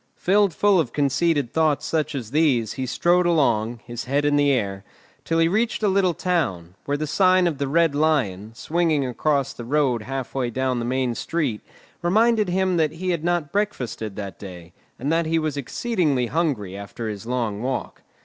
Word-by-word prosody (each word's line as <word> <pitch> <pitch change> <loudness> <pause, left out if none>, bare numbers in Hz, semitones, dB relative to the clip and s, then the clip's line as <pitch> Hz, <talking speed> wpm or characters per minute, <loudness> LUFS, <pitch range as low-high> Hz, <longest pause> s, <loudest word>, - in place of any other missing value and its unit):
Filled 200 +1 +2
full 200 +3 +3
of 125 -8 -1
conceited 145 -2 +1
thoughts 155 -3 +1
such 155 -3 -1
as 120 -5 -5
these 140 -7 +2
he 130 -1 -4
strode 175 +6 +2
along, 120 -8 +1
his 120 0 -6
head 140 +3 0
in 145 0 +3
the 145 0 +3
air, 100 -7 -1 0.4
till 165 - -1
he 165 0 +4
reached 220 +5 0
a - - +4
little 190 -3 +2
town, 95 - -1
where 145 0 -1
the 155 - -2
sign 185 +3 +3
of 160 -5 -1
"The 140 - -1
Red 165 +1 +2
Lion," 115 -9 0
swinging 155 +1 0
across 140 +2 0
the 120 - -8
road 130 -2 +1
halfway 130 +1 -3
down 130 +1 -1
the 115 - -3
main 130 0 0
street, 135 -3 -2 0.4
reminded 215 +3 +3
him 185 0 +1
that 155 -2 +1
he 180 +3 -2
had 170 -3 -2
not 175 -4 0
breakfasted 125 - -2
that 100 -4 -7
day, 90 -3 -10 0.2
and 140 +5 -2
that 165 0 +1
he 165 +1 +1
was 155 -3 -1
exceedingly 145 - 0
hungry 120 - -1
after 100 +3 -6
his 105 +1 -6
long 115 -4 -2
walk. 130 +1 -4
145 Hz, 190 wpm, -23 LUFS, 120-170 Hz, 0.4 s, he